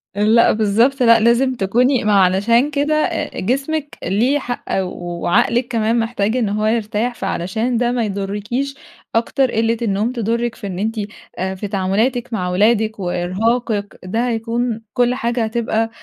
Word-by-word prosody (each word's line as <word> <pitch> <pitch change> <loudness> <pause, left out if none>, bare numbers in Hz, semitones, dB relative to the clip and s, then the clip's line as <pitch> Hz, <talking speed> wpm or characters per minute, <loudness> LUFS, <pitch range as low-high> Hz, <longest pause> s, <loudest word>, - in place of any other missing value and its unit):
لأ، 215 +3 +4
بالضبط 230 +6 +2
لأ، 230 -1 +6
لازم 235 +4 +3
تكوني 245 +6 +2
ما 210 -1 +2
علشان 205 +8 +3
كده 290 +1 0
أ 330 +2 -1
جسمِك 275 +7 -2
ليه 235 +10 +1
حق 245 -3 -5 0.2
وعقلِك 175 +6 0
كمان 230 -1 +1
محتاج 225 0 -1
إن 220 -5 0
هو 215 +1 -1
يرتاح، 225 +2 0
فعلشان 220 +8 -2
ده 240 +1 +1
ما 245 -2 0
يضرّكيش 210 +7 -3 0.4
أكتر، 245 +3 +1
قِلّة 225 +1 +1
النوم 215 +1 0
تضرِّك 235 0 -1
في 205 - -7
إن 185 -2 -5
أنتِ 220 +3 -1 0.4
أ 190 +1 -2
في 205 +2 -5
تعاملاتِك 220 +6 0
مع 180 -4 -1
ولادِك 215 +3 +2
وإرهاقِك، 205 +4 -1
ده 225 +7 -1
هيكون 230 0 -2
كل 245 0 +2
حاجة 235 -2 -1
هتبقى 225 0 -1
225 Hz, 150 wpm, -19 LUFS, 205-245 Hz, 0.4 s, لأ